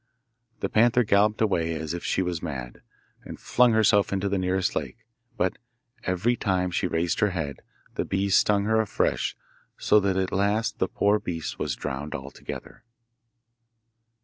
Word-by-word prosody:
The - - 0
panther 120 +2 +4
galloped 105 +1 +2
away 85 -6 +1
as 80 0 -4
if 85 - -5
she 95 - 0
was 90 -3 -3
mad, - - -6 0.4
and - - -9
flung 125 -1 +3
herself 110 -2 +4
into 100 0 0
the 100 -1 0
nearest 95 0 0
lake, 110 -1 -5 0.3
but 90 - 0 0.5
every 95 +7 +1
time 95 -4 0
she 90 - 0
raised 85 0 -1
her 105 - +3
head, 75 -8 -4 0.3
the - - -1
bees 95 0 0
stung 100 -1 +3
her 110 +1 +2
afresh 110 - -1 0.4
so 105 -1 +3
at 95 -1 0
last 100 +4 0
the - - +2
poor 105 +1 +2
beast 85 -6 -5
was - - -1
drowned 70 +3 -5
altogether. 70 +8 -8
95 Hz, 155 wpm, -26 LUFS, 85-105 Hz, 0.5 s, panther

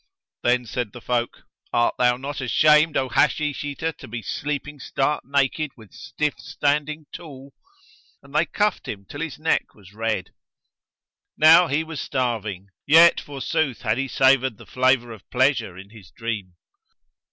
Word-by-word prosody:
Then 125 0 +2
said 120 -2 -4
the 120 - -9
folk, 120 0 -2 0.3
"Art 120 0 +2
thou 125 -1 +3
not 140 +1 -5
ashamed, 150 +4 +4
O 130 - 0
Hashish 150 +4 +1
eater, 145 +3 -3
to - - -13
be 115 0 -6
sleeping 145 +5 -4
stark 135 +3 -1
naked 140 +2 0
with 110 -3 -16
stiff 150 -1 -3
standing 150 +1 -1
tool?" 140 -5 -11 0.7
And - - -17
they - - +2
cuffed 210 -1 -1
him 100 -1 -6
till 145 +9 -8
his 165 -4 -4
neck 160 +1 -1
was 100 -2 -17
red. 110 -4 -2 1.1
Now 165 +3 +7
he 145 +3 0
was 160 -2 -6
starving, 110 -7 -3 0.2
yet 165 +3 +7
forsooth 140 -2 -2
had 110 +1 0
he 135 - -1
savoured 130 -2 +3
the - - -14
flavour 130 -2 +1
of 110 -3 -13
pleasure 125 -8 +1
in 100 +2 -12
his 105 -6 -15
dream. 105 -4 -5
130 Hz, 155 wpm, -23 LUFS, 115-150 Hz, 1.1 s, Now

